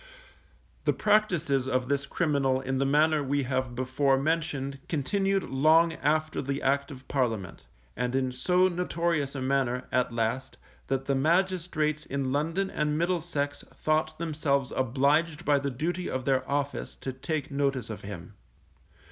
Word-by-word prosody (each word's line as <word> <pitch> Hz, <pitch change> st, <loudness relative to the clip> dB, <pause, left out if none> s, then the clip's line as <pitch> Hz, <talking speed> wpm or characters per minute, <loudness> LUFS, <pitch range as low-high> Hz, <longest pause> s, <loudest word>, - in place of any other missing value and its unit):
The -, -, +3 dB
practices 175 Hz, -11 st, +2 dB
of 130 Hz, -1 st, 0 dB
this 140 Hz, 0 st, 0 dB
criminal 140 Hz, -6 st, +1 dB
in 130 Hz, 0 st, -2 dB
the 135 Hz, -, +2 dB
manner 150 Hz, +2 st, +3 dB
we 140 Hz, 0 st, 0 dB
have 130 Hz, -1 st, -2 dB
before 130 Hz, +2 st, +2 dB
mentioned 140 Hz, -2 st, -1 dB
continued 195 Hz, +6 st, +1 dB
long 160 Hz, +5 st, +4 dB
after 155 Hz, +1 st, 0 dB
the 140 Hz, +1 st, -2 dB
Act 140 Hz, +2 st, +1 dB
of 130 Hz, -3 st, -11 dB
Parliament; 115 Hz, -9 st, -2 dB, 0.3 s
and 125 Hz, +2 st, -1 dB
in 130 Hz, -1 st, +1 dB
so 180 Hz, +9 st, +3 dB
notorious 170 Hz, -5 st, -1 dB
a 135 Hz, -, -3 dB
manner, 130 Hz, -2 st, 0 dB
at 125 Hz, -1 st, +1 dB
last, 115 Hz, +3 st, -2 dB, 0.3 s
that 135 Hz, 0 st, -1 dB
the 140 Hz, -, +1 dB
magistrates 160 Hz, 0 st, +1 dB
in 135 Hz, -1 st, -2 dB
London 165 Hz, +7 st, 0 dB
and 150 Hz, 0 st, 0 dB
Middlesex 165 Hz, -4 st, -1 dB
thought 155 Hz, 0 st, 0 dB
themselves 145 Hz, -5 st, 0 dB
obliged 145 Hz, +5 st, +1 dB
by 145 Hz, -1 st, +4 dB
the 140 Hz, 0 st, -2 dB
duty 170 Hz, +8 st, -2 dB
of 130 Hz, -1 st, -3 dB
their 135 Hz, -1 st, +1 dB
office 140 Hz, 0 st, -2 dB
to 130 Hz, -, -5 dB
take 150 Hz, +2 st, -3 dB
notice 135 Hz, -5 st, -1 dB
of 110 Hz, -, -7 dB
him. 95 Hz, -1 st, -8 dB
140 Hz, 150 wpm, -28 LUFS, 130-160 Hz, 0.3 s, long